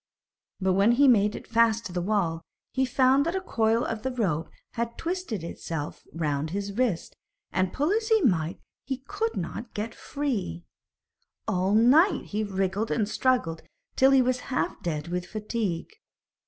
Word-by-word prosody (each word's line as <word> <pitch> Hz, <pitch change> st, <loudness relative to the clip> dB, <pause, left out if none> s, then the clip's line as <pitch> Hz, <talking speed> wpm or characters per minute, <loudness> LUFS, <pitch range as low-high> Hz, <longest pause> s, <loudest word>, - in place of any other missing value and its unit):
But 190 Hz, -1 st, +2 dB
when 200 Hz, +5 st, +4 dB
he 270 Hz, +4 st, +4 dB
had 270 Hz, -, +8 dB
made 210 Hz, -2 st, +3 dB
it -, -, -8 dB
fast 230 Hz, -1 st, +2 dB
to 180 Hz, -, -6 dB
the 180 Hz, -, -1 dB
wall, 175 Hz, -4 st, 0 dB, 0.3 s
he 265 Hz, 0 st, +2 dB
found 260 Hz, +2 st, +4 dB
that 340 Hz, -, -1 dB
a -, -, +1 dB
coil 230 Hz, -9 st, +1 dB
of 225 Hz, -1 st, -3 dB
the 260 Hz, -, -1 dB
rope 185 Hz, -11 st, -1 dB, 0.2 s
had 235 Hz, 0 st, -3 dB
twisted 335 Hz, -, -3 dB
itself 165 Hz, -2 st, -6 dB
round 150 Hz, -2 st, -1 dB
his 200 Hz, +3 st, -3 dB
wrist, 230 Hz, -8 st, -1 dB, 0.4 s
and, 185 Hz, 0 st, +1 dB
pull 295 Hz, +5 st, 0 dB
as 440 Hz, +1 st, +1 dB
he 445 Hz, -1 st, +5 dB
might, 175 Hz, -, +1 dB, 0.2 s
he 265 Hz, -1 st, -4 dB
could 445 Hz, +3 st, -2 dB
not 230 Hz, +1 st, -5 dB
get 220 Hz, +2 st, -3 dB
free. 220 Hz, -, -3 dB, 0.8 s
All 190 Hz, +3 st, +1 dB
night 290 Hz, -, +5 dB
he 210 Hz, +1 st, -1 dB
wriggled 195 Hz, +1 st, -1 dB
and 215 Hz, -3 st, +1 dB
struggled 215 Hz, -9 st, +1 dB, 0.3 s
till 265 Hz, -, +6 dB
he 270 Hz, -1 st, +5 dB
was 255 Hz, 0 st, +1 dB
half 255 Hz, -, -1 dB
dead 155 Hz, -2 st, -3 dB
with 180 Hz, 0 st, -3 dB
fatigue. 210 Hz, -5 st, -3 dB
220 Hz, 170 wpm, -27 LUFS, 180-255 Hz, 0.8 s, had